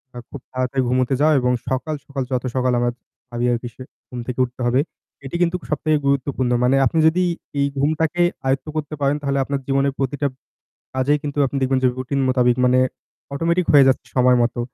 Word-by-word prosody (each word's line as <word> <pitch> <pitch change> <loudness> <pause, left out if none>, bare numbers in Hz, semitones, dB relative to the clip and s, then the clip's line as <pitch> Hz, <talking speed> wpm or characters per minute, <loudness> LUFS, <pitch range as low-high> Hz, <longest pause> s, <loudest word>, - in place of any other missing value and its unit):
আ - - -7
খুব 140 - -9
তাড়াতাড়ি 130 +1 -1
ঘুমুতে 130 +1 +1
যাওয়া 155 +2 +4
এবং 125 0 +1 0.2
সকাল, 130 +4 -2
সকাল 140 -1 -4
যত 125 -1 0
সকাল 125 -1 +1
আমরা 120 0 +1 0.4
ভাবি 120 0 -2
আরকি 120 0 -2
সে - - -13 0.3
ঘুম 125 - -7
থেকে 125 0 -4
উঠতে 125 +1 -12
হবে। 125 +2 +2 0.5
এটি 135 - -6
কিন্তু 175 +1 +2
সবথেকে 155 +1 +1
গুরুত্বপূর্ণ। 135 -2 0
মানে 125 +2 +3
আপনি 160 +6 +1
যদি 175 +3 +2 0.4
এই 140 - +3
ঘুমটাকে 155 +4 +1 0.3
আয়ত্ত 135 +2 0
করতে 155 -1 -3
পারেন, 140 +1 +2
তাহলে 140 -1 -1
আপনার 140 +1 -2
জীবনের 135 0 +1
প্রতিটা 140 +2 -1 0.7
কাজেই 135 +3 +2
কিন্তু 145 0 -5
আপনি 135 - -4
দেখবেন 130 0 +2
যে, 130 - +6
রুটিন 130 +2 -2
মোতাবিক 125 -2 +3
মানে 125 0 +4 0.5
অটোমেটিক 170 +4 +1
হয়ে 140 -2 +8
যাচ্ছে 130 - +1
সময় 125 0 +5
মতো। 120 0 -2
135 Hz, 190 wpm, -21 LUFS, 125-145 Hz, 0.7 s, হয়ে